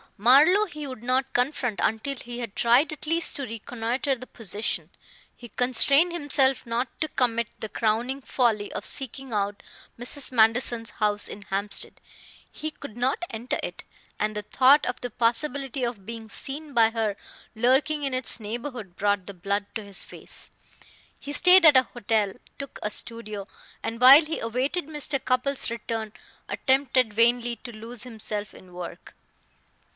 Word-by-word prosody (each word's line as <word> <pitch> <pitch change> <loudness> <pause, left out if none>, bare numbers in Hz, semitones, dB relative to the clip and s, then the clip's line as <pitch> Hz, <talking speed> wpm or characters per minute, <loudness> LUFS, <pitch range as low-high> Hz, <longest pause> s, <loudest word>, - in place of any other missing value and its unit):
Marlowe 290 - +6
he 305 -6 -8
would 255 -5 -8
not 260 +2 0
confront 245 -4 -1
until 225 +6 -1
he 240 -1 -8
had 230 -5 -6
tried 245 +7 +3
at 305 0 -7
least 330 +1 0
to 280 - -3
reconnoiter 240 +3 -3
the 255 +1 -11
position. 215 -1 -3 0.5
He 240 - -11
constrained 275 - +3
himself 280 -5 +2
not 235 +2 -1
to 310 - +1
commit 235 -5 0
the 220 - -5
crowning 235 +6 -1
folly 225 -6 0
of - - -5
seeking 270 -1 -1
out 200 -1 -2 0.4
Mrs. 260 +3 +1
Manderson's 230 0 +2
house 210 -1 0
in 205 - -9
Hampstead; 200 +2 +2 0.5
he 310 - -5
could 280 -7 -11
not 260 +7 0
enter 230 +3 -3
it, - - -6 0.4
and 215 0 -1
the 210 - -2
thought 270 +7 +4
of 250 - -3
the 245 - -3
possibility 255 +3 -1
of 235 -5 -4
being 225 0 -8
seen 285 +7 -5
by 225 -2 +4
her 220 -3 -1 0.4
lurking 265 +6 +2
in 275 -2 -1
its 255 -1 +5
neighborhood 230 -3 -6
brought 205 -1 0
the 200 - -9
blood 200 +3 -2
to 220 - -5
his 200 -1 0
face. - - -8 0.7
He 285 - -7
stayed 360 +4 +6
at 295 -4 +8
a 260 - +6
hotel, 220 -5 -1 0.3
took 280 -2 -8
a 210 - -1
studio, 215 -3 -2 0.4
and 230 +1 -4
while 275 +5 +10
he 320 +1 -4
awaited 260 +8 -2
Mr. 295 -3 -1
Cupples' 255 0 0
return 225 -1 -4 0.4
attempted 260 -4 +1
vainly 235 +2 +2
to 240 - -10
lose 225 +1 -7
himself 215 -4 -4
in 180 -1 -16
work. 175 -1 -9
240 Hz, 160 wpm, -25 LUFS, 220-270 Hz, 0.7 s, while